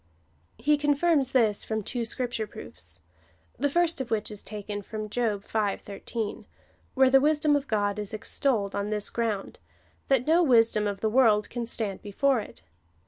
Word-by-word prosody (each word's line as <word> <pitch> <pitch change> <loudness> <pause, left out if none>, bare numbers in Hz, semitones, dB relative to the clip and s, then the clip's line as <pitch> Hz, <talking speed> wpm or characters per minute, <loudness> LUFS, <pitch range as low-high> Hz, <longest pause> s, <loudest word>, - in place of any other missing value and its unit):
He 295 0 +2
confirms 290 -1 +2
this 220 -5 +3
from 220 -1 -3
tiuo 235 +2 -3
Scripture 240 -2 -2
proofs, - - -8 0.6
tlie 285 - +1
Jirst 340 -2 +2
of 250 - -5
wliicli 220 -1 -1
is 210 - -5
taken 205 0 -5
from 215 +1 -6
Job 215 -3 -1
V. 210 -3 0
13, 210 +2 -5 0.5
wliere 265 -1 +5
tlie 270 0 +6
wisdom 300 0 +3
of 285 -1 -1
God 205 -1 0
is 210 -2 -4
extolled 215 -1 -1
on 200 +1 -2
tliis 210 -1 -2
ground, 220 -4 -2 0.5
that 265 -2 +2
no 330 +3 +4
wisdom 230 -7 +4
of 200 -1 -4
the 220 - +1
Avorld 220 -4 +4
can 235 -1 -4
stand 210 -5 -2
before 250 +5 +1
it. 80 - -9
225 Hz, 170 wpm, -27 LUFS, 210-270 Hz, 0.6 s, tlie